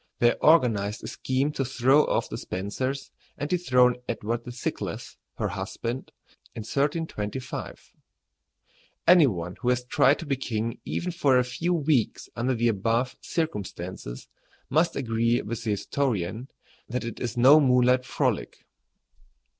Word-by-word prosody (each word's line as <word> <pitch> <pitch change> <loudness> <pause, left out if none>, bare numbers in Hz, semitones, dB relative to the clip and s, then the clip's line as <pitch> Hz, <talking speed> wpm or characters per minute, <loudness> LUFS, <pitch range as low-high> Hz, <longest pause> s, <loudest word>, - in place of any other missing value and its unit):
They 120 0 +4
organized 115 -10 +3
a - - -5
scheme 130 +3 -1
to 140 - -2
throw 130 +3 +3
off - - 0
the - - -6
Spencers 130 +9 -4 0.3
and 145 - -3
dethrone 125 -8 +3
Edward 115 0 -2
the 120 - -6
Thinkless, 120 - -5 0.2
her - - -1
husband, 120 +3 -5 0.4
in 115 - -5
1325. 135 -2 -3 1.2
Any 170 -4 +8
one 90 -5 -4
who 125 - +1
has 125 0 +1
tried 135 +3 +4
to 165 - -7
be 140 -2 -1
king 115 -3 -3
even 180 - -2
for 145 -6 +3
a 125 - +4
few 130 +9 -1
weeks 150 -7 0
under 125 +2 0
the 120 +1 +1
above 115 +4 0
circumstances 95 - -4 0.4
must 160 +4 +2
agree 115 -2 +1
with 115 +2 -5
the - - -1
historian 110 0 -1 0.4
that 125 +2 -3
it 115 - -6
is 120 -1 -4
no 135 +6 +8
moonlight 125 -2 +4
frolic. - - -2
125 Hz, 140 wpm, -26 LUFS, 115-140 Hz, 1.2 s, Any